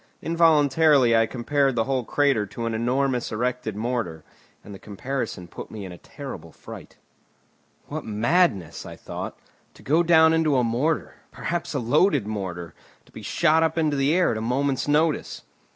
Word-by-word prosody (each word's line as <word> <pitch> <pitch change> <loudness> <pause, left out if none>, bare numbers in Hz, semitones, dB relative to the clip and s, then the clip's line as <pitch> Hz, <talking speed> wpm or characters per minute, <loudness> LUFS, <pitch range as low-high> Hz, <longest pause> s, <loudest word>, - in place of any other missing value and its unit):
Involuntarily 150 -5 +4
I 115 0 +3
compared 135 +2 0
the 115 - +2
whole 130 0 -1
crater 135 -5 +1
to 115 +4 -6
an 115 - -2
enormous 125 +2 0
erected 120 -1 -2
mortar, 105 -8 -3 0.4
and 105 - -11
the 95 - -10
comparison 110 -3 -5
put - - -9
me 105 -3 -7
in 95 - -8
a 90 - -11
terrible 110 - -9
fright. - - -12 0.9
"What - - -6
madness," 110 - 0
I - - -9
thought, - - -7 0.4
"to - - -17
go 155 +5 +3
down 160 -1 +5
into 160 -4 +2
a 125 - +2
mortar, 125 +8 -1
perhaps 170 -2 -4
a - - +1
loaded 145 - +2
mortar, 90 -6 -5 0.3
to - - -23
be - - -10
shot 160 -1 +2
up 160 0 0
into 155 -3 +1
the 135 +1 +1
air 180 0 +3
at 110 - -2
a - - -4
moment's 130 +4 -1
notice!" 150 +1 0
130 Hz, 170 wpm, -24 LUFS, 110-150 Hz, 0.9 s, down